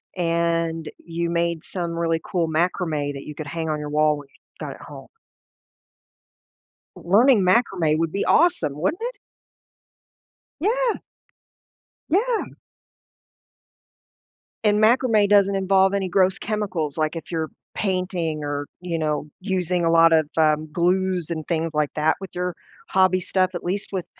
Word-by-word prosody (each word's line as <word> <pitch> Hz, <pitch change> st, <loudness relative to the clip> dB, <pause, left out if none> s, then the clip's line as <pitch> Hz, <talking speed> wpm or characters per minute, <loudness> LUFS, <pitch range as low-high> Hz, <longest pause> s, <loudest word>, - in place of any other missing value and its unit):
and 165 Hz, -2 st, 0 dB
you 170 Hz, 0 st, -3 dB
made 170 Hz, -1 st, -1 dB
some 175 Hz, -3 st, -4 dB
really 165 Hz, -1 st, 0 dB
cool 170 Hz, -3 st, -1 dB
macrame 160 Hz, -3 st, -1 dB
that 140 Hz, 0 st, -7 dB
you 150 Hz, -, -8 dB
could 155 Hz, -, -6 dB
hang 160 Hz, +1 st, -3 dB
on 150 Hz, -1 st, -1 dB
your 150 Hz, 0 st, -5 dB
wall 150 Hz, 0 st, +2 dB
when 145 Hz, -, -11 dB
you -, -, -28 dB, 0.2 s
got -, -, -6 dB
at -, -, -16 dB
home. -, -, -11 dB, 1.9 s
L -, -, -12 dB
learning 230 Hz, +3 st, +6 dB
macrame 185 Hz, -5 st, +2 dB
would 165 Hz, 0 st, -1 dB
be 200 Hz, -, -1 dB
awesome, 170 Hz, -, +2 dB
wouldn't 315 Hz, -, -1 dB
it? -, -, -3 dB, 1.5 s
Yeah! 470 Hz, +5 st, +1 dB, 1.1 s
Yeah! 445 Hz, +6 st, +1 dB, 2.1 s
And 210 Hz, -1 st, +3 dB
macrame 225 Hz, -2 st, +4 dB
doesn't 200 Hz, -1 st, +4 dB
involve 195 Hz, 0 st, +3 dB
any 195 Hz, -2 st, 0 dB
gross 185 Hz, +1 st, +2 dB
chemicals, 190 Hz, -9 st, -2 dB
like, 155 Hz, +1 st, 0 dB
if 165 Hz, -, -7 dB
you're 160 Hz, -2 st, -2 dB, 0.2 s
painting 180 Hz, -6 st, -2 dB
or, 145 Hz, 0 st, -3 dB
you 175 Hz, -2 st, -3 dB
know, 150 Hz, -1 st, -2 dB
using 180 Hz, -3 st, 0 dB
a 165 Hz, -, +3 dB
lot 165 Hz, 0 st, +6 dB
of, 160 Hz, -2 st, +3 dB
um, 155 Hz, -1 st, +2 dB
glues 180 Hz, 0 st, 0 dB
and 160 Hz, -2 st, -4 dB
things 165 Hz, -1 st, -1 dB
like 150 Hz, -1 st, +1 dB
that 155 Hz, +1 st, +2 dB
with 195 Hz, -, -7 dB
your 180 Hz, -1 st, -3 dB, 0.3 s
hobby 185 Hz, -1 st, +3 dB
stuff, 185 Hz, 0 st, 0 dB
at 175 Hz, -, -5 dB
least 195 Hz, +3 st, -3 dB
with 190 Hz, -3 st, -3 dB
170 Hz, 150 wpm, -23 LUFS, 160-195 Hz, 2.1 s, learning